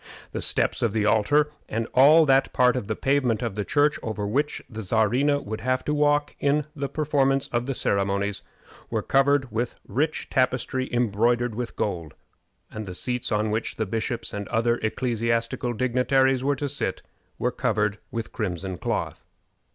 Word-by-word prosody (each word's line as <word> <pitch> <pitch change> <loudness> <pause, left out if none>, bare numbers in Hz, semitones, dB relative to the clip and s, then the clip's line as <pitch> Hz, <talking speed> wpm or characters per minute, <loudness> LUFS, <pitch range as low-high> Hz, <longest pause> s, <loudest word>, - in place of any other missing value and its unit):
The - - -4
steps - - +2
of 115 -3 +1
the 110 -2 +1
altar, 145 +8 +3 0.2
and 115 +1 -1
all 155 +5 +7
that 135 -1 +3
part 125 0 +4
of 125 -6 -3
the 110 - -1
pavement 130 -3 +1
of 115 -4 -2
the 105 +1 -2
church 145 +6 +2
over 110 -2 -3
which 140 +8 -1
the 110 -1 -7
Czarina 120 +8 +2
would 110 +1 -5
have 130 +2 0
to 150 - 0
walk 145 0 +2
in 145 +1 +1
the 140 -1 -3
performance 135 -3 +1
of 120 +1 -1
the 135 - -2
ceremonies, 100 0 0 0.5
were - - -1
covered 135 -1 +2
with 115 +2 -2
rich 150 +4 -1
tapestry 130 0 0
embroidered 120 +1 +1
with 120 +1 -5
gold, 85 -7 -3 0.6
and 110 -1 -6
the 90 - -6
seats 125 +5 -2
on 105 0 +1
which 110 +1 -2
the 110 - -1
bishops 115 +3 -3
and 100 -1 -4
other 120 +1 +1
ecclesiastical 115 +1 -1
dignitaries 130 +2 +2
were 140 +1 +2
to 145 +2 -3
sit 140 -9 -3 0.3
were 125 - 0
covered 105 -5 0
with 115 -1 -5
crimson 95 -3 -4
cloth. - - -3
120 Hz, 170 wpm, -25 LUFS, 110-135 Hz, 0.6 s, all